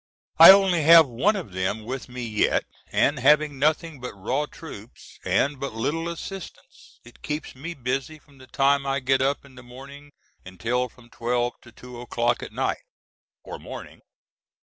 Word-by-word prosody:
I - - +12
only 190 -3 +6
have 165 +1 +8
one 135 - +1
of 175 - -6
them 95 +4 -3
with 130 +3 -6
me 125 0 -7
yet, 110 -3 0 0.3
and 145 -1 +1
having 145 +1 +3
nothing 155 +1 0
but 125 -4 -7
raw 130 +10 -2
troops, 120 -10 -13
and 140 0 0
but 140 -4 -5
little 155 +9 -2
assistance, 175 +2 -10
it 120 - -17
keeps 150 +1 -5
me 165 +6 -7
busy 135 +3 -3
from 145 -2 -23
the 130 - -15
time 140 +1 +1
I 135 0 0
get 130 0 +1
up 140 +1 -1
in 140 - -17
the 130 - -13
morning 140 +4 -13 0.3
until 115 +7 -2
from 120 0 -21
12 120 +1 -1
to 120 - -16
2 125 +1 -11
o'clock 120 0 -1
at - - -8
night, - - -2 0.6
or - - -8
morning. - - -10
135 Hz, 170 wpm, -24 LUFS, 120-150 Hz, 0.6 s, I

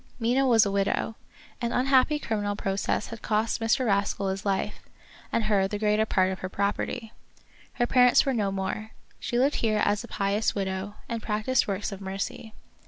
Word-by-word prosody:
Mina 250 +4 +2
was 225 -3 +5
a 200 - -1
widow. 200 +2 0 0.5
An 235 -1 -1
unhappy 265 +4 +3
criminal 205 -6 -2
process 195 +1 -1
had 230 -1 -8
cost 220 +1 0
Mr. 225 +3 +2
Rascal 200 -2 +1
his 190 0 -3
life, 195 -1 -1 0.5
and 230 - +1
her 205 -3 +2
the 205 - -3
greater 210 +1 +2
part 185 -2 +2
of 190 - -5
her 185 - -5
property. 205 +4 -2 0.6
Her 240 - +1
parents 250 +2 +5
were 270 - +1
no 205 -5 0
more. 195 +3 -4 0.3
She 240 - -2
lived 275 +4 +2
here 215 -2 +1
as 205 0 +1
a - - -9
pious 200 +2 0
widow, 190 +1 -3
and 230 -1 -3
practiced 215 +4 0
works 200 +1 -2
of 195 0 -7
mercy. 195 +3 -5
210 Hz, 180 wpm, -27 LUFS, 195-230 Hz, 0.6 s, was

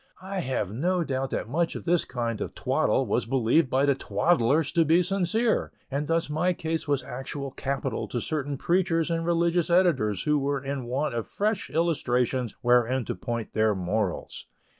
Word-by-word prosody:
I 195 0 -4
have 125 - -2
no 175 +8 +1
doubt 135 -3 -2
that - - -3
much 165 +7 0
of - - -6
this 175 -1 +2
kind 115 -3 -3
of - - -5
twaddle - - +1
was - - 0
believed 130 +4 +2
by 135 +2 +2
the 140 - +4
twaddlers 145 0 +1
to 165 - +3
be 165 +3 +4
sincere; 195 +5 0 0.2
and 145 +2 -2
thus 165 0 +1
my 160 +5 +1
case 160 -1 -3
was 140 -3 +1
actual 135 +1 -6
capital 135 +1 -3
to 120 - -3
certain 145 +1 -3
preachers 170 +1 +1
and 165 0 0
religious 170 0 +2
editors 140 - +2
who 150 -1 +2
were 140 0 -1
in 135 -2 -3
want 135 +4 -1
of 115 -4 -3
fresh 210 - -1
illustrations 130 -7 0
wherewith 125 +1 +3
to - - -3
point 115 -3 -4
their 110 -1 +2
morals. 95 +1 -2
140 Hz, 180 wpm, -27 LUFS, 125-170 Hz, 0.2 s, the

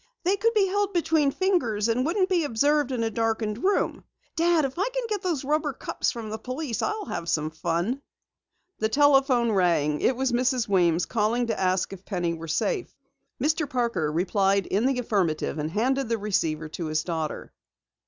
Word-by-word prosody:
They 375 +3 +2
could 460 +3 +1
be 410 -2 +4
held 405 +1 0
between 320 -4 +2
the - - -7
fingers 245 - +1
and 235 +2 +1
wouldn't 370 +6 +1
be 360 -4 +1
observed 290 +2 +1
in 240 -3 -1
a 225 - -1
darkened 225 -1 -1
room. 395 +2 +1 0.3
Dad, 335 -2 +3
if 270 +5 -5
I 405 +6 +1
can - - -3
get 420 -3 -2
those 335 -7 -1
rubber 295 +1 0
cups - - -2
from 225 -3 -5
the 220 - -4
police, 255 +1 -4
I'll 425 -1 -2
have 170 - -4
some 155 0 0
fun!" 170 - -2 0.8
The 220 - +1
telephone 270 -3 +4
rang. 170 -6 +2
It 260 - +2
was 260 0 0
Mrs. 250 0 +1
Weems 175 -4 +2
calling 235 +2 0
to 230 -2 -2
ask 185 0 0
if 190 -1 -11
Penny 175 -5 -2
were 165 0 -7
safe. 360 - -1 0.5
Mr. 305 -1 0
Parker 230 -12 0
replied 195 +3 +1
in 210 +6 +1
the 270 -1 +1
affirmative 190 -11 -1
and 150 +1 -2
handed 255 +7 0
the 230 - +1
receiver 165 -7 -1
to 165 +1 -5
his 155 0 0
daughter. 160 -3 -4
235 Hz, 190 wpm, -26 LUFS, 185-300 Hz, 0.8 s, be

